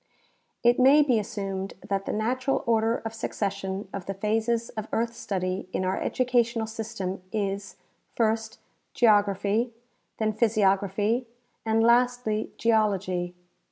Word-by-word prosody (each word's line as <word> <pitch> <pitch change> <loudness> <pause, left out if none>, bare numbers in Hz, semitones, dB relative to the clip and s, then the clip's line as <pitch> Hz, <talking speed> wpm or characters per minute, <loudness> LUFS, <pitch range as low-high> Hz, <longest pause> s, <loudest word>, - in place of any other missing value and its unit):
* - - -46
It 240 +1 +4
may 275 +4 +7
be 250 -6 +2
assumed 195 -2 -4
that 195 -1 -1
the - - 0
natural 255 +5 0
order 225 0 +1
of 225 - -3
succession 200 -3 -3
of 195 -3 -6
the 195 - -3
phases 225 +3 0
of 215 -2 -6
earth 230 +1 0
study 185 -4 -3
in 185 - 0
our 185 - -1
educational 240 -2 +1
system 220 -4 -5
is 200 -2 -3 0.2
— - - -43
first, 220 -1 0 0.4
geography, 210 +1 +3 0.4
then 215 -1 0
physiography, 210 +1 +1 0.4
and 225 0 +3
lastly, 240 -2 +2
geology. 195 -6 +1
220 Hz, 130 wpm, -27 LUFS, 195-230 Hz, 0.4 s, may